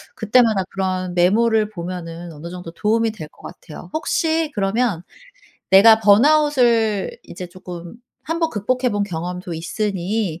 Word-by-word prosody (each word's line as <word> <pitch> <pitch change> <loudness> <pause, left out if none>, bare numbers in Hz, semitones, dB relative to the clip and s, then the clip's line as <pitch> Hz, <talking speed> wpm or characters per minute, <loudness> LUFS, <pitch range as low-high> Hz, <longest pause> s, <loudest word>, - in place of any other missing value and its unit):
그 220 - -7
때마다 225 -6 +4
그런 185 -2 -2
메모를 215 +4 +3
보면은 175 -3 -7
어느 155 +3 -9
정도 180 -1 -8
도움이 220 +5 0
될 190 -8 -9
것 - - -22
같아요. 175 +3 -11
혹시 320 0 0
그러면 200 -2 0 0.7
내가 220 +3 +7
번아웃을 235 -2 +3
이제 180 +1 -8
조금 175 0 -10 0.3
1 330 +2 -3
번 325 -1 +1
극복해 250 +4 -1
본 205 -1 -1
경험도 180 -1 -5
있으니 190 +1 -2
200 Hz, 290 characters per minute, -20 LUFS, 180-230 Hz, 0.7 s, 내가